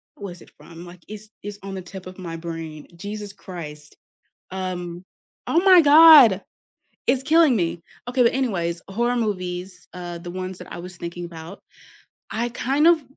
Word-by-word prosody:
what 205 - -9
was 175 - -18
it - - -17
from? 170 +1 -12
Like, 175 0 -13
it's 215 0 -10
it's 205 0 -7
on 195 -1 -6
the 190 - -5
tip 185 +1 -10
of 185 - -10
my 170 -2 -6
brain, 165 -2 -7
Jesus 205 +2 -6
Christ. 150 -7 -10 0.6
Um. 180 -2 -5 0.4
Oh 335 - +3
my 370 -3 +8
god, 290 - +8 0.7
it's 265 - +2
killing 315 -3 +5
me. 170 -2 -2 0.3
Okay, 250 +1 +2
but 235 - +4
anyways, 175 -10 -1
horror 235 +5 0
movies, 180 -4 -4
uh, 175 -1 -6
the 175 +1 -8
ones 185 0 -5
that 180 - -11
I - - -7
was 180 +1 -9
thinking 175 0 -6
about, 170 +2 -10 0.7
I 235 +2 -2
kind 275 +6 +1
of 335 -3 +5
185 Hz, 175 wpm, -23 LUFS, 175-235 Hz, 0.7 s, my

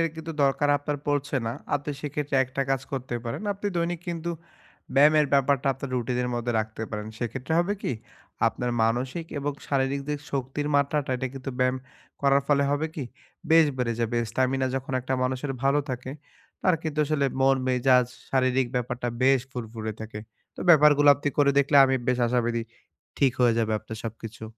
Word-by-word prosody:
এর 165 - +3
কিন্তু 160 0 -6
দরকার 140 +1 +2
আপনার 145 0 -3
পড়ছে 145 -1 0
না। - - 0 0.2
আপনি 145 +1 -2
সেক্ষেত্রে 145 -1 -3
একটা 130 +2 -2
কাজ 135 -1 +1
করতে 130 -2 -3
পারেন। 115 - -4
আপনি 200 +1 -6
দৈনিক 170 0 -1
কিন্তু 170 0 -3 0.6
ব্যায়ামের 150 +1 +6
ব্যাপারটা 140 0 +2
আপনার 135 0 -6
routine 125 0 -1
এর 125 - -1
মধ্যে 120 0 -1
রাখতে 110 +1 -6
পারেন। 105 -1 -4
সেক্ষেত্রে 130 +5 -4
হবে 190 +4 +1
কি? - - -1 0.6
আপনার 125 +1 -3
মানসিক 125 +8 -1
এবং 145 +1 -2 0.2
শারীরিক 135 0 0
দিক 150 -1 -1
শক্তির 140 +2 -2
মাত্রাটা, 140 -1 +1
এটা 130 - -2
কিন্তু 135 0 -5
ব্যায়াম 130 +1 +2 0.5
করার 140 0 +4
ফলে 140 -1 +4
হবে 145 +2 0
কি? 145 - -4 0.5
বেশ 160 0 +7
বেড়ে 120 -2 0
যাবে। 115 +1 0
Stamina 130 +1 +1
যখন 135 0 -5
একটা 130 +1 -2
মানুষের 130 +2 -1
ভালো 140 +2 +3
থাকে, 125 +1 -5 0.5
তার 185 -2 +4
কিন্তু 155 -1 -4
আসলে 140 -2 +1
মন, 135 0 +5
মেজাজ, 125 -1 +4 0.2
শারীরিক 130 -1 +2
ব্যাপারটা 125 0 -2
বেশ 135 -1 +5
ফুরফুরে 110 -2 -5
থাকে। 110 -1 -7 0.4
তো - - -8
ব্যাপারগুলো 145 -2 +6
আপনি 145 +1 -2
করে 140 -1 +5
দেখলে 140 +1 +3
আমি 135 0 +2
বেশ 125 0 +2
আশাবাদী 120 -1 0 0.6
ঠিক 135 -3 +4
হয়ে 120 -2 +5
যাবে 110 -1 +1
আপনার 110 +1 -8
সবকিছু। 115 0 -8
135 Hz, 175 wpm, -26 LUFS, 125-145 Hz, 0.6 s, বেশ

